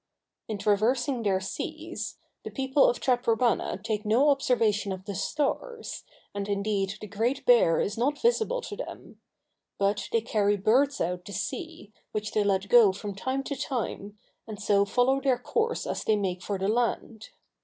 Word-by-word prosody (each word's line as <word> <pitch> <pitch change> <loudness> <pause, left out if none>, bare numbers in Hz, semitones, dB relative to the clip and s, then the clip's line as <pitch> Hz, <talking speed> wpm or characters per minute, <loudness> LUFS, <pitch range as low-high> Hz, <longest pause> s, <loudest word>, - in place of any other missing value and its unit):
In 215 - -3
traversing 230 +5 +1
their 195 -3 +1
seas, 190 - -5 0.3
the - - -5
people 270 +1 +3
of 240 - -2
Taprobana 245 -2 +1
take 215 -1 -2
no 235 +7 +3
observations 220 -7 +1
of 190 0 -14
the 200 - -4
stars, 295 - -3 0.3
and 200 0 -4
indeed 200 -1 -1
the - - -7
Great 225 +6 -1
Bear 225 -10 +5
is 210 +3 -2
not 285 +4 +1
visible 480 +1 +1
to 420 - -7
them; - - -9 0.6
but 200 0 0
they 230 - +2
carry 205 -2 +1
birds 265 +8 +2
out 180 +1 -2
to 200 - -8
sea, 265 - -5 0.2
which 215 0 -3
they 210 - +2
let 195 -1 +1
go 230 -3 +7
from 200 +1 -6
time 260 +7 -2
to 280 - -4
time, 215 -6 -4 0.3
and 215 -2 -7
so 200 -1 +3
follow 255 +5 +2
their 265 -3 +2
course 455 - -1
as - - -3
they 220 - +3
make 185 -3 -2
for 200 +1 -3
the 190 +1 -1
land. 230 -1 -1
220 Hz, 170 wpm, -27 LUFS, 200-260 Hz, 0.6 s, go